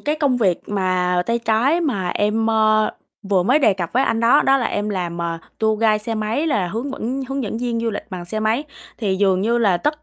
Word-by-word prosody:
cái 300 +1 -1
công 285 -5 +1
việc 195 -8 +2
mà 185 -2 0
tay 230 0 +1
trái 235 +8 +1
mà 205 - -1
em, 210 +4 0
ơ, 215 -1 +3 0.4
vừa 185 -3 +3
mới 255 +10 +3
đề 220 -9 +3
cập 175 -3 -4
với 255 - +3
anh 225 -3 0
đó, 230 +1 +5
đó 270 - +4
là 245 -4 0
em 205 +1 -2
làm, 175 -4 -3
à, 165 -1 -3 0.2
tour 220 -1 +1
guide 215 -2 +3
xe 225 +2 -4
máy 220 +8 -1
là 205 - 0
hướng 230 +9 -4
vẫn 265 +1 -3
hướng 270 0 -2
dẫn 220 +1 -4
viên 235 -1 -2
du 230 0 -1
lịch 205 - -5
bằng 180 -2 -6
xe 215 +5 -4
máy. 220 +6 0 0.3
Thì 195 -5 -1
dường 190 -2 +2
như 230 +4 +1
là 200 -6 +3
tất 300 - -2
220 Hz, 245 wpm, -20 LUFS, 195-245 Hz, 0.4 s, đó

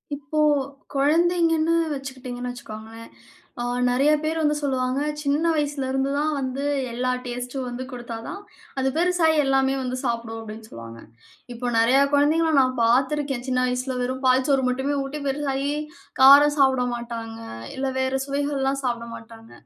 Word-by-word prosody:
இப்போ, 285 +2 -4 0.5
குழந்தைங்கன்னு 330 +2 +2 0.2
வச்சுக்கிட்டிங்கன்னு 255 -2 -6
வச்சுக்கோங்களேன். 225 -1 -10 0.5
அ - - -1 0.3
நிறைய 275 +4 +3
பேர் 320 +1 -1
வந்து 300 -1 +2
சொல்லுவாங்க, 260 -2 0 0.2
"சின்ன 290 +2 0
வயசுலருந்துதான் 280 0 -1
வந்து 265 +1 -3 0.3
எல்லா 255 +1 0
டேஸ்ட்டும் 250 +1 -4
வந்து 245 +1 -5
குடுத்தா 240 -2 -7
தான், 385 - -6 0.4
அது 265 - +1
பெருசாயி 340 -2 +3
எல்லாமே 270 0 +2
வந்து 255 0 -3
சாப்பிடும்" 230 -2 -3
அப்டின்னு 220 0 -9
சொல்லுவாங்க. 115 0 -10 0.5
இப்போ 245 +1 -4
நிறைய 245 +4 +4
குழந்தைங்கள 315 +3 +3
நான் 255 0 +1
பாத்துருக்கேன் 260 +2 +1
சின்ன 255 -1 +1
வயசுல 250 +1 -2
வெறும் 260 +2 -3
பால் 255 0 +4
சோறு 270 -2 +3
மட்டுமே 265 +3 -1
ஊட்டி, 275 +2 -5
பெருசாயி, 275 0 -1 0.5
காரம் 285 +2 +8
சாப்பிட 265 -2 +4
மாட்டாங்க. 230 -1 -6 0.4
இல்ல 265 0 -2
வேற 260 0 0
சுவைகள்லாம் 275 -1 -1
சாப்பிட 235 -2 -2
மாட்டாங்க. 225 0 -13
265 Hz, 135 wpm, -24 LUFS, 245-285 Hz, 0.5 s, காரம்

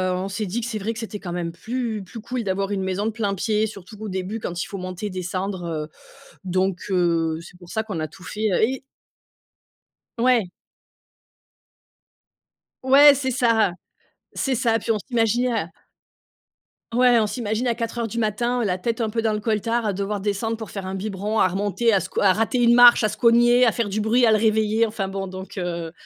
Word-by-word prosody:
on 185 +1 -3
s'est 205 +2 -3
dit 220 +6 -2
que - - -4
c'est 230 -2 -3
vrai 210 +3 -2
que - - -11
c'était 220 -3 -6
quand 175 -3 -6
même 175 -1 -3
plus 225 +3 -4
plus 210 +4 -10
cool 240 +2 -4
d'avoir 195 0 -2
une 200 -1 -1
maison 190 +2 -2
de 225 - 0
plein 205 -3 -2
pied, 215 +3 0
surtout 200 0 -11
au 215 - -5
début, 190 +4 -4
quand 175 -5 -4
il - - -6
faut 195 - -7
monter, 185 +3 -5
descendre, 185 0 -4
heu, 155 -2 -3 0.6
donc 185 0 -1
heu, 170 -3 +1
c'est 180 +1 -14
pour 175 -1 -14
ça 220 - -2
qu'on 200 -7 -5
a 155 - -2
tout 180 - -16
fait, 215 +3 -2 0.2
et 265 +1 -4 1.4
Ouais. 235 -5 +2 2.3
Ouais, 280 +2 +8
c'est 265 -1 -2
ça, 230 -5 +2 0.6
c'est 270 - -1
ça. 230 -2 +2
Puis 225 - -5
on 220 - +2
s'imaginait 240 +2 0
à 210 -8 -1 1.3
ouais 245 0 +5
on 215 - +1
s'imagine 225 +1 -2
à 235 - +1
04:00 230 0 -3
du 225 - -7
matin, 235 +3 0
la 185 -4 0
tête 230 +5 -2
un 225 - 0
peu 225 +1 -1
dans 220 -1 +1
le 210 - -2
coltar, 230 +2 0
à 210 - +1
devoir 200 +1 -3
descendre 210 +3 -1
pour 220 -2 -8
faire 195 -2 -6
un 190 +1 -4
biberon, 205 +2 -3
à 185 - +5
remonter, 205 +4 0
à 200 - +4
sco - - -3
à 195 - +5
rater 225 +6 0
une 235 0 +6
marche, 240 -1 +8
à 215 - +3
se - - -6
cogner, 240 +1 +5
à 230 - +3
faire 235 -4 -1
du 205 +2 -2
bruit, 230 +3 +3
à 225 - +4
le 215 - +5
réveiller. 220 +1 +2
Enfin 210 -3 -4
bon, 195 0 -4
donc 190 +2 -9
heu, 170 -2 -3
215 Hz, 210 wpm, -23 LUFS, 190-230 Hz, 2.3 s, Ouais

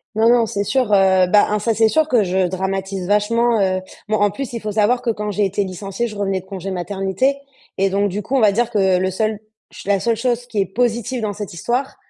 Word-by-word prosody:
Non, 225 +1 +4
non, 240 -1 +4
c'est 200 -2 -2
sûr, 245 0 0
heu, 190 -2 +4
bah, 205 +3 +5
un 210 - 0
ça 225 +2 0
c'est 220 0 +3
sûr 315 +5 +2
que 245 -7 +3
je 185 0 +1
dramatise 190 +1 -3
vachement, 225 +4 +2
heu 185 -1 +1 0.3
bon 215 - +1
en 205 -1 +2
plus, 250 +4 -6
il 230 - -4
faut 215 - -3
savoir 220 +4 +2
que 245 - -2
quand 210 -2 -2
j'ai 205 +1 0
été 200 +1 0
licenciée, 195 +5 -4
je 215 - -9
revenais 195 -2 -1
de 185 - -15
congé 195 0 -6
maternité 195 +8 -1 0.4
et 195 +1 +2
donc 200 +1 +1
du 200 +3 -3
coup, 225 - -7
on - - +3
va 210 -4 +4
dire 235 +2 +1
que 190 -3 +2
le 185 +1 0
seul 215 +2 -1 0.3
ch - - -10
la 200 -1 +2
seule 230 +3 0
chose 240 +1 -1
qui 225 -4 -2
est - - +1
positive 235 +3 -1
dans 210 -2 -2
cette 205 -2 -7
histoire, 245 - -2
205 Hz, 255 wpm, -19 LUFS, 195-230 Hz, 0.4 s, bah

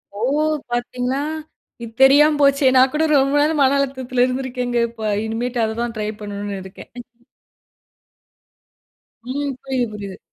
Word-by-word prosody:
ஓ! - - -7 0.5
பாத்தீங்களா! 250 +2 -2 0.6
இது 230 - -7
தெரியாம 295 +3 +6
போச்சு. 280 0 +3
நான் 260 +1 +5
கூட 315 +1 +1
ரொம்ப 275 0 +3
நாள் 305 +1 +1
மன 270 0 +4
அழுத்தத்தில 260 -2 -1
இருந்திருக்கேங்க 250 -1 -3
இப்ப 220 -2 -4
இனிமேட்டு 240 +2 -3
அத 220 0 -4
தான் 240 -1 -3
ட்ரை 210 0 -2
பண்ணணுனு 205 -1 -5
இருக்கேன். 190 +1 -13 2.3
ம். 280 +3 -3
புரியுது, 260 -2 -1
புரியுது. 200 -2 -7
250 Hz, 130 wpm, -20 LUFS, 225-275 Hz, 2.3 s, தெரியாம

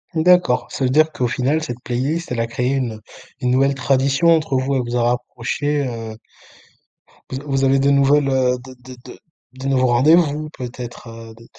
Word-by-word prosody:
D'accord, 170 -5 +3
ça 135 - -3
veut 125 - +2
dire 155 +4 +3
qu'au 125 - -1
final, 140 +5 -1
cette 120 -4 -6
playlist, 135 +7 -2
elle 115 - -1
a 115 - -1
créé 125 +2 -2
une 120 -5 -2 0.4
une 125 - 0
nouvelle 135 +2 +2
tradition 135 +4 +1
entre 160 -5 +3
vous. 135 +1 -1
Elle 130 - +1
vous 120 +1 -2
a 120 - +1
rapprochées, 125 +4 -2
heu 115 -2 -6 1.1
vous 130 - -4
a 140 - -12
vous 135 -1 -1
avez 135 0 +3
de 140 - +2
nouvelles, 140 0 +3
heu, 130 -1 +1
de 130 - -11
de 130 -1 -11
de - - -12 0.4
de 135 - -4
nouveaux 130 -2 +2
rendez-vous, 150 +4 +3
peut-être, 120 -1 -8
heu, 115 0 -11
de 115 0 -17
130 Hz, 195 wpm, -19 LUFS, 125-145 Hz, 1.1 s, D'accord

